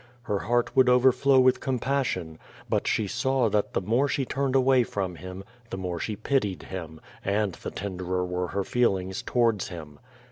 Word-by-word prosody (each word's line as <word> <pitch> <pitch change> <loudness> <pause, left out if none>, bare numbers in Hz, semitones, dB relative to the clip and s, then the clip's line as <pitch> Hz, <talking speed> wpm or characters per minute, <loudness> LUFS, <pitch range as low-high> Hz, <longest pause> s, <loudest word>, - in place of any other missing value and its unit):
Her 105 -4 -1
heart 120 +3 0
would 130 -1 +6
overflow 130 +2 +5
with 130 0 +4
compassion. 125 - -2 0.3
But - - 0
she 110 - +1
saw 130 +3 +1
that 105 0 0
the - - 0
more 120 +9 +2
she 135 0 -1
turned 135 +1 -1
away 130 -1 +5
from 95 -6 -3
him, 95 +2 -8 0.3
the - - -5
more 90 -2 -3
she 105 - -3
pitied 110 -4 -1
him, 80 -4 -7 0.2
and 100 -1 0
the - - -7
tenderer 90 -2 -3
were 90 0 -2
her 100 +2 -2
feelings 95 -5 0
towards 115 -5 +1
him. 75 -4 -9
105 Hz, 175 wpm, -26 LUFS, 95-125 Hz, 0.3 s, would